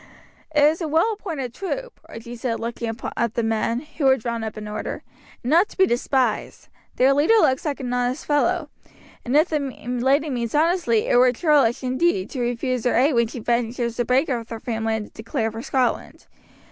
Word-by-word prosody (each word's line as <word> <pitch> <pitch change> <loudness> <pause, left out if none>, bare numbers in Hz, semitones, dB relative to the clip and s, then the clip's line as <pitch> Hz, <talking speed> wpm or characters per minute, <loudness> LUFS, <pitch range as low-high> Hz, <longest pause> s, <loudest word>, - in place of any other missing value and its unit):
"It 295 -2 +2
is 310 +4 +3
a 325 - -1
well 325 +9 +2
appointed 315 - -5
troop," 480 - -5
Archie 235 +1 -8
said 235 -1 -3
looking 230 0 -3 0.2
at 235 -1 -1
the 235 - 0
men, 225 +2 0
who 305 -1 -5
were 265 0 +5
drawn 235 -1 -4
up 220 0 -5
in 210 0 -6
order, 210 - -5 0.4
"and 245 - -2
not 345 +6 +4
to - - -15
be 380 - +6
despised. 245 - -1 0.3
Their 265 +2 +4
leader 295 +11 +4
looks 275 -9 +3
an 270 -4 -3
honest 250 +3 -1
fellow; 305 +2 +1 0.5
and 260 +4 +1
if 315 +4 +4
the 305 - 0
lady 270 +2 -1
means 235 -1 -2
honestly 315 - +2
it - - +3
were 250 0 +6
churlish 275 -3 +2
indeed, 255 - 0
to 260 - -4
refuse 245 0 -1
her 245 - +2
aid 270 +6 +4
when 235 -1 +3
she 235 - -8
ventures 235 0 -1
to 240 - +1
break 260 +6 +2
with 235 -4 -3
her 225 - -6
family 225 -1 -2
and 215 -1 -4
to - - -18
declare 225 -1 -2
for 225 +1 -6
Scotland. 250 -2 -1
250 Hz, 200 wpm, -23 LUFS, 235-295 Hz, 0.5 s, be